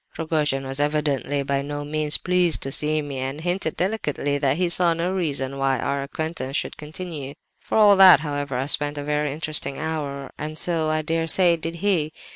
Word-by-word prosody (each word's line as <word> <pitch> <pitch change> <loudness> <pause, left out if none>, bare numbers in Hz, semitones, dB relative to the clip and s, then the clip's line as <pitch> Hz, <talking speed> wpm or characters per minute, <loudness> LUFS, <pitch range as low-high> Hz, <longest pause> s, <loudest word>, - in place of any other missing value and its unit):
"Rogojin 150 -4 -1
was 135 +1 -3
evidently 145 -1 0
by 140 0 -1
no 145 +1 -5
means 150 0 +1
pleased 180 -2 +1
to 135 - -4
see 150 +1 +1
me, 140 -2 -5
and 135 +3 -4
hinted, 175 -1 -1
delicately, 150 -7 -1
that 140 0 +1
he 180 0 +1
saw 170 -1 +2
no 170 +2 -1
reason 140 -7 -2
why 135 -1 +1
our 140 +3 -2
acquaintance 140 -1 -4
should - - -3
continue. 150 -2 -7 0.2
For - - -2
all 210 -2 +7
that, 190 -4 +9
however, 145 -3 -3
I 130 - -1
spent 145 +1 +1
a 145 - -4
very 150 0 -1
interesting 150 -2 -3
hour, 145 -3 -4
and 155 +1 -5
so, 165 -3 0
I 155 0 0
dare 165 +1 -1
say, 175 0 +4
did 165 0 -5
he. 160 -6 +1
150 Hz, 195 wpm, -23 LUFS, 140-165 Hz, 0.2 s, that